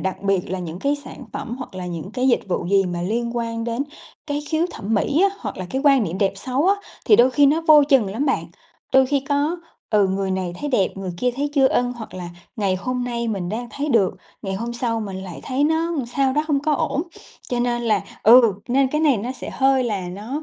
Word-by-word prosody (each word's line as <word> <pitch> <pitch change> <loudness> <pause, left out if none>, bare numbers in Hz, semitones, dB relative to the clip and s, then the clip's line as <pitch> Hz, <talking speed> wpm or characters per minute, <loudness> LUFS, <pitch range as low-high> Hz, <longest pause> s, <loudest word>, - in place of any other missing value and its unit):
đặc 190 0 -2
biệt 195 -3 0
là 190 - -2
những 175 -1 -6
cái 280 +7 0
sản - - -10
phẩm 265 -3 -5
hoặc 255 -7 -8
là 180 -1 -5
những 175 +1 -6
cái 255 0 +1
dịch 245 - +3
vụ 175 - -1
gì 195 +1 +3
mà 175 -1 -3
liên 235 +5 -2
quan 230 -1 -2
đến 235 +3 -1 0.4
cái 290 -1 -2
khiếu 320 +1 +1
thẩm 220 -7 -3
mỹ 285 - +2
á, 400 - -13
hoặc - - -5
là 185 - -5
cái 265 +1 -2
quan 275 -3 +5
niệm 175 +1 -4
đẹp 195 -2 +2
xấu 260 - -1
á, 395 - +5 0.3
thì 420 - +6
đôi 255 +2 +6
khi 285 +2 +4
nó 300 +4 +3
vô 300 -1 +9
chừng 270 -7 +4
lắm 245 +9 -2
bạn. 270 - +1 0.5
Đôi 265 0 +6
khi 280 +1 +1
có, 290 +4 +1 0.3
ừ, 205 -3 +4
người 190 0 -1
này 185 -2 -2
thấy 295 - -2
đẹp, 200 -8 +2
người 195 -1 -4
kia 250 +7 +1
thấy 290 +1 -1
chưa 270 -2 +5
ưng, 245 0 +1
hoặc 235 -3 -9
là 180 -1 -6 0.3
ngày 195 -3 +1
hôm 250 +5 -2
nay 235 -1 -2
mình 195 -5 -2
đang 230 +4 -3
thấy 290 +2 -3
được, 210 -9 +3 0.3
ngày 195 -1 -3
hôm 230 +4 -4
sau 235 -1 -1
mình 200 -3 -5
lại 180 -3 -8
thấy 265 +2 0
nó 320 +2 +2
làm 260 -5 -2
sao 265 +2 +1
đó, 300 +3 +1
không 290 -3 +1
có 305 +2 0
ổn. 280 +2 -1 0.5
Cho 245 -1 -1
nên 240 0 0
là 225 -2 +1 0.2
ừ, 230 0 +7 0.2
nên 265 +2 +3
cái 300 +3 -1
này 295 -5 +4
nó 235 +5 -3
sẽ 260 - -7
hơi 265 -1 +3
là 200 -6 -2
nó 220 - -5
240 Hz, 255 wpm, -22 LUFS, 195-275 Hz, 0.5 s, vô